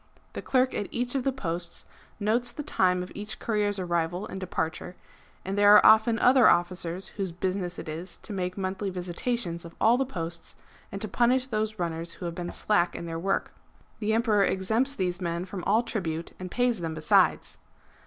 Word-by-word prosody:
^ - - -36
The - - -5
clerk 255 0 +2
at 205 - -2
each 245 0 -2
of 270 -2 -1
the 270 - +1
posts 170 -8 -4 0.3
notes 235 +4 +1
the 295 +5 -6
time 180 -9 +1
of 180 - -10
each 210 +1 -6
courier's 210 -3 0
arrival 175 +1 -1
and 190 - -7
departure; 180 -1 -3 0.5
and 190 +1 -2
there 205 0 +7
are - - +7
often 220 +1 +6
other 250 -1 +6
officers 175 +1 0
whose 195 -3 -2
business 180 0 -3
it - - -7
is 165 +4 -6
to 210 - -7
make 180 -1 -3
monthly 195 +1 -2
visitations 180 +1 -3
of 170 0 -11
all 230 +3 +5
the 270 - +2
posts, 170 -7 -6 0.4
and 195 - -5
to - - -2
punish 245 +5 +2
those 215 -3 -2
runners 170 -1 -3
who - - -8
have 170 - -3
been 175 0 -5
slack 180 -5 +1
in - - -5
their 165 -1 -4
work.^) 195 +3 -1 0.5
The 220 0 0
Emperor 220 -3 +3
exempts 220 +10 +2
these 180 -1 -2
men 170 0 -2
from 185 -1 -7
all 220 +4 +3
tribute, 170 -8 -4
and 185 0 -6
pays 245 0 +1
them 165 -2 -4
besides. 155 -1 +2
190 Hz, 195 wpm, -27 LUFS, 175-220 Hz, 0.5 s, there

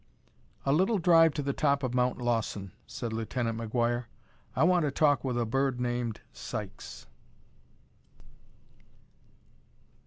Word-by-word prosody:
"A 135 - +3
little 190 +8 +3
drive 165 -2 +6
to 145 - -1
the 140 0 -1
top 140 -1 +1
of 125 -1 -1
Mount 125 0 +1
Lawson," 115 -5 -1 0.2
said 115 -2 -5
Lieutenant 115 +1 -2
McGuire. 120 +1 0 0.5
"I - - +3
want 175 0 +4
to 150 - +1
talk 145 -2 +3
to 125 -3 -1
a 120 - +1
bird 135 +2 0
named 120 -2 -2
Sykes." - - -7
125 Hz, 125 wpm, -29 LUFS, 120-145 Hz, 0.5 s, drive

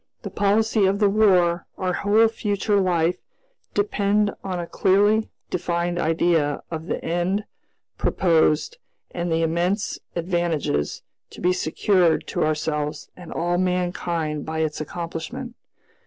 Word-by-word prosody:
The - - -5
policy 210 0 +2
of 195 +1 +1
the 205 -1 +3
War, 180 -5 +3
our 185 -1 -1
whole 210 +4 +4
future 205 -2 0
life, 175 -1 +1 0.6
depend 205 0 +1
on 185 -2 -3
a 170 - -3
clearly 205 +5 +2 0.2
defined 175 0 -1
idea 160 -3 +1
of 160 0 -5
the - - -3
end 175 +5 0 0.6
proposed 165 - +2 0.3
and 175 -1 -3
the 165 0 +2
immense 175 +6 0 0.2
advantages 170 - -1 0.3
to - - -12
be 180 +1 +2
secured 180 0 +2
to - - 0
ourselves 150 -1 -2
and 180 -2 -11
all 175 +1 0
mankind 175 -4 -1
by 160 0 -3
its 155 -1 -2
accomplishment. 170 - -5
175 Hz, 125 wpm, -23 LUFS, 165-200 Hz, 0.6 s, whole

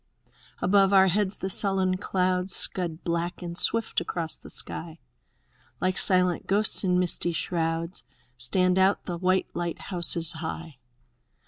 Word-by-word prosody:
Above 195 +1 +4
our 190 -1 +5
heads 200 +2 0
the - - -4
sullen 190 -1 +1
clouds 185 0 -1
Scud 170 -3 -2
black 170 +1 -3
and 170 -1 -6
swift 225 +5 0
across 165 -2 -4
the - - -13
sky; 165 -1 -6 0.8
Like 185 0 0
silent 180 -2 +2
ghosts 210 +2 +5
in 180 -1 +2
misty 175 -1 0
shrouds 165 +1 -2 0.3
Stand 180 +9 +3
out 190 +2 +2
the 175 -2 -5
white 185 +1 0
Hghthouses 170 -1 -1
high. 160 -3 -7
180 Hz, 130 wpm, -26 LUFS, 170-190 Hz, 0.8 s, our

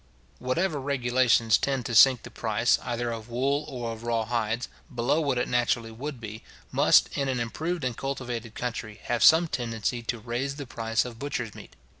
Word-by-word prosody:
Whatever 145 +4 -1
regulations 125 -4 +3
tend 135 -3 -1
to 115 - -3
sink 125 +1 +7
the - - -10
price, - - +1
either 120 -1 -2
of 115 0 -7
wool 140 +5 0
or 120 -5 -4
of 110 -1 -8
raw 115 -1 0
hides, 115 0 -1 0.2
below 125 +5 +1
what 140 -4 0
it 125 - 0
naturally 120 -2 0
would 135 +3 -6
be, 110 -1 -8 0.3
must, - - +4
in 140 - 0
an 130 -2 -1
improved 155 - -3
and 125 -2 -1
cultivated 120 -4 -4
country, 115 -3 -4
have 120 -1 0
some 165 +2 +7
tendency 120 -3 -2
to 115 +1 -3
raise 120 +5 -3
the 140 -1 -6
price 115 -1 -1
of 120 -2 -8
butcher's 125 -6 -3
meat. - - -13
120 Hz, 185 wpm, -27 LUFS, 115-135 Hz, 0.3 s, sink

